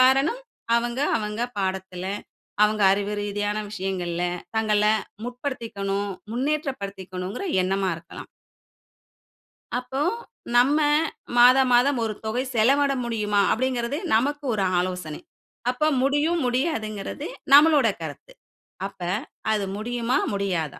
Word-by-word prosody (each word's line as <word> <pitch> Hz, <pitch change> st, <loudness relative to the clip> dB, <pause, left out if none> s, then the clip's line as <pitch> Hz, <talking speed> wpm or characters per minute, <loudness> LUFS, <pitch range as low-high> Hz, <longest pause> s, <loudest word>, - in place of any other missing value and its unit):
காரணம் 270 Hz, -, +4 dB, 0.4 s
அவங்க, 240 Hz, +1 st, -1 dB, 0.2 s
அவங்க 210 Hz, +1 st, -3 dB, 0.2 s
பாடத்துல, 190 Hz, -1 st, -3 dB, 0.6 s
அவங்க 210 Hz, 0 st, +1 dB
அறிவு 205 Hz, +1 st, -1 dB
ரீதியான 205 Hz, 0 st, -2 dB
விஷயங்கள்ல 185 Hz, -4 st, -3 dB, 0.3 s
தங்கள 215 Hz, -2 st, +2 dB, 0.4 s
முற்படுத்திக்கணும், 225 Hz, -6 st, -3 dB, 0.2 s
முன்னேற்றப்படுத்திக்கணுங்கிற 200 Hz, -, -3 dB, 0.2 s
எண்ணமா 190 Hz, +1 st, 0 dB
இருக்கலாம். 170 Hz, -, -11 dB, 1.5 s
அப்போ 255 Hz, +2 st, -4 dB, 0.6 s
நம்ம, 275 Hz, +5 st, +5 dB, 0.6 s
மாத 250 Hz, +2 st, +8 dB
மாதம் 250 Hz, +2 st, +4 dB
ஒரு 220 Hz, -1 st, -2 dB
தொகை 220 Hz, +3 st, -1 dB
செலவிட 275 Hz, +5 st, +4 dB
முடியுமா? 210 Hz, -3 st, 0 dB
அப்படிங்கிறது 255 Hz, +2 st, -1 dB, 0.2 s
நமக்கு 290 Hz, +6 st, +1 dB
ஒரு 200 Hz, -2 st, 0 dB
ஆலோசனை. 180 Hz, -4 st, -3 dB, 0.5 s
அப்ப 280 Hz, +5 st, +1 dB
முடியும் 295 Hz, +5 st, +2 dB
முடியாதுங்கிறது, 245 Hz, -2 st, -2 dB, 0.3 s
நம்மளோட 290 Hz, -3 st, +7 dB
கருத்து. 160 Hz, -, -8 dB, 0.6 s
அப்ப 200 Hz, -, -17 dB, 0.5 s
அது 210 Hz, -2 st, +1 dB
முடியுமா, 240 Hz, +3 st, -1 dB, 0.2 s
முடியாதா? 180 Hz, -7 st, -2 dB
220 Hz, 100 wpm, -24 LUFS, 195-260 Hz, 1.5 s, மாத